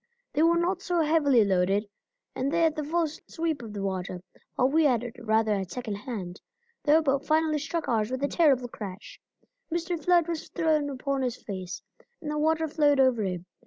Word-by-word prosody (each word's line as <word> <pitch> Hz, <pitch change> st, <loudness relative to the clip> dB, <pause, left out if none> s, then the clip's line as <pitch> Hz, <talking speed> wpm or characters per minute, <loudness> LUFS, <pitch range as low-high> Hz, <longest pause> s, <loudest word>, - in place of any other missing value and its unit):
They 300 Hz, -, +1 dB
were 335 Hz, +1 st, +4 dB
not 360 Hz, +2 st, 0 dB
so 355 Hz, -3 st, 0 dB
heavily 290 Hz, -7 st, +4 dB
loaded, 195 Hz, +2 st, +1 dB, 0.5 s
and 270 Hz, +2 st, -1 dB
they 335 Hz, +1 st, +1 dB
had 320 Hz, -2 st, +3 dB
the 305 Hz, -, -2 dB
full 330 Hz, +3 st, +1 dB
sweep 320 Hz, -1 st, -4 dB
of 225 Hz, -3 st, -8 dB
the 200 Hz, -1 st, -4 dB
water, 185 Hz, -2 st, -3 dB, 0.3 s
while 255 Hz, -, +3 dB
we 310 Hz, +3 st, +3 dB
had 245 Hz, -5 st, +3 dB
it 240 Hz, 0 st, -7 dB
rather 220 Hz, -1 st, +1 dB
at 195 Hz, -3 st, -2 dB
second 240 Hz, -3 st, -4 dB
hand. 200 Hz, -5 st, -6 dB, 0.4 s
Their 315 Hz, +2 st, +4 dB
boat 275 Hz, -1 st, +1 dB
finally 310 Hz, 0 st, +2 dB
struck 325 Hz, +3 st, -3 dB
ours 220 Hz, -2 st, +1 dB
with 260 Hz, +2 st, -3 dB
a -, -, +3 dB
terrible 280 Hz, -7 st, +3 dB
crash. 205 Hz, -4 st, -9 dB, 0.5 s
Mr. 340 Hz, -1 st, -2 dB
Flood 350 Hz, -2 st, +4 dB
was 335 Hz, -2 st, -4 dB
thrown 310 Hz, -4 st, +1 dB
upon 275 Hz, 0 st, -2 dB
his 250 Hz, -2 st, -2 dB
face, 185 Hz, -3 st, -6 dB, 0.4 s
and 305 Hz, -3 st, -5 dB
the 300 Hz, -, -1 dB
waters 315 Hz, 0 st, +1 dB
flowed 290 Hz, -2 st, +4 dB
over 260 Hz, -4 st, +4 dB
him. 180 Hz, -3 st, -3 dB
280 Hz, 200 wpm, -27 LUFS, 220-320 Hz, 0.5 s, were